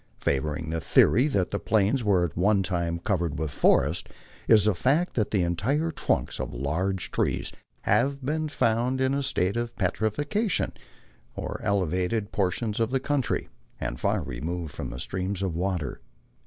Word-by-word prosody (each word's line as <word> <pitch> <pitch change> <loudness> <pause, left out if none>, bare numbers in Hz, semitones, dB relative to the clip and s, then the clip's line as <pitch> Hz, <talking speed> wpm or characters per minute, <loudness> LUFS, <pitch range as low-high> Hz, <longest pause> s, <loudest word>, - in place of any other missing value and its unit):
Favoring 75 +3 -1
the 80 0 -2
theory 125 - +4
that 100 -11 0
the 100 - -1
Plains 110 +4 +2
were 95 -5 +3
at 80 - -6
one 100 +2 +3
time 85 -2 -1
covered 85 -4 -1
with 80 -1 -2
forests, - - +2 0.4
is 105 -3 +6
the 105 - +4
fact 140 - +1
that 110 -4 0
entire 105 - +1
trunks - - -1
of - - -4
large 90 +9 -1
trees - - 0 0.3
have 130 +6 +1
been 155 +2 -1
found 120 0 +1
in 130 +1 +2
a 140 - 0
state 95 -7 0
of 120 0 -2
petrifaction 145 - 0 0.6
on - - -4
elevated 100 +2 0
portions 105 +3 -1
of 115 -1 +2
the 135 +1 +1
country, 140 -1 -1 0.3
and - - -3
far 100 0 +1
removed 80 +5 -4
from - - -5
streams 95 +7 -2
of 90 -4 -1
water. 90 -7 -2
100 Hz, 155 wpm, -27 LUFS, 85-120 Hz, 0.6 s, is